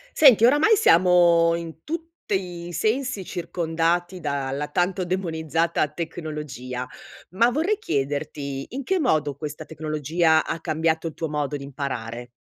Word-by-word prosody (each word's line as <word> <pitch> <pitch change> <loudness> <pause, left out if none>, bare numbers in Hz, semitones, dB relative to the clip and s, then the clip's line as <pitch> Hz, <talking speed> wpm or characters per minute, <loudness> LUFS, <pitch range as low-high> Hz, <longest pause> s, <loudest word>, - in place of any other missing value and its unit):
Senti, 250 -7 +7
oramai, 295 - +5
siamo 170 - +5
in 165 -1 -7
tutti 200 - -4
i 175 - -8
sensi 220 - -1
circondati 175 +1 -1
dalla 140 -2 -2
tanto 180 +4 0
demonizzata 165 -3 0
tecnologia, 150 -6 -5 0.5
ma 230 +6 +4
vorrei 330 - +1
chiederti: 140 - -3
in 275 +2 -5
che 380 +7 0
modo 155 - +1
questa 150 +2 -6
tecnologia 160 +1 +1
ha 165 - -3
cambiato 160 0 -1
tuo 160 +1 -4
modo 150 -1 -2
di 140 - -6
imparare? 125 -4 -5
165 Hz, 125 wpm, -24 LUFS, 150-185 Hz, 0.5 s, Senti